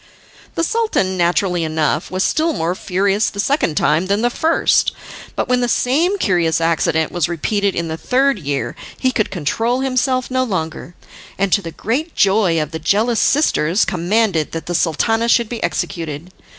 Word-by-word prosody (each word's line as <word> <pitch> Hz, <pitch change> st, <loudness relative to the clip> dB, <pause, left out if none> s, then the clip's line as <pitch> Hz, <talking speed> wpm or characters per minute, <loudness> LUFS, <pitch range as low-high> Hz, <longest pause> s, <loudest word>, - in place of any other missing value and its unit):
The 330 Hz, -, 0 dB
Sultan, 430 Hz, -, 0 dB
naturally 175 Hz, 0 st, +1 dB
enough, 155 Hz, 0 st, -1 dB
was 185 Hz, +1 st, -1 dB
still 320 Hz, +1 st, +1 dB
more 170 Hz, -, -1 dB
furious 195 Hz, +3 st, 0 dB
the 200 Hz, -, -9 dB
second 205 Hz, -, 0 dB
time 160 Hz, +5 st, +2 dB
than 200 Hz, +3 st, 0 dB
the 240 Hz, -, +2 dB
first, 320 Hz, +6 st, +2 dB, 0.4 s
but -, -, -1 dB
when 250 Hz, 0 st, +2 dB
the 245 Hz, -, +1 dB
same 320 Hz, -, +1 dB
curious 170 Hz, -, +1 dB
accident 160 Hz, -1 st, +1 dB
was 175 Hz, -2 st, -1 dB
repeated 200 Hz, +4 st, -1 dB
in 170 Hz, -1 st, -2 dB
the 160 Hz, 0 st, -4 dB
third 265 Hz, +3 st, +1 dB
year 140 Hz, -3 st, -3 dB, 0.2 s
he 260 Hz, -, +1 dB
could 215 Hz, -4 st, 0 dB
control 225 Hz, -, -1 dB
himself 255 Hz, -1 st, 0 dB
no 255 Hz, 0 st, +1 dB
longer, 175 Hz, -5 st, -4 dB, 0.4 s
and, 195 Hz, -1 st, 0 dB
to 200 Hz, -, +3 dB
the 165 Hz, -, -6 dB
great 265 Hz, -, -3 dB
joy 195 Hz, -4 st, +3 dB
of 155 Hz, 0 st, -3 dB
the 160 Hz, -, -5 dB
jealous 215 Hz, +8 st, +1 dB
sisters, 205 Hz, -, +2 dB
commanded 180 Hz, -2 st, 0 dB
that 165 Hz, -, -5 dB
the 175 Hz, -, -4 dB
Sultana 225 Hz, +8 st, +1 dB
should 235 Hz, -1 st, +3 dB
be 235 Hz, -, -5 dB
executed. 165 Hz, 0 st, -3 dB
195 Hz, 175 wpm, -18 LUFS, 165-245 Hz, 0.4 s, to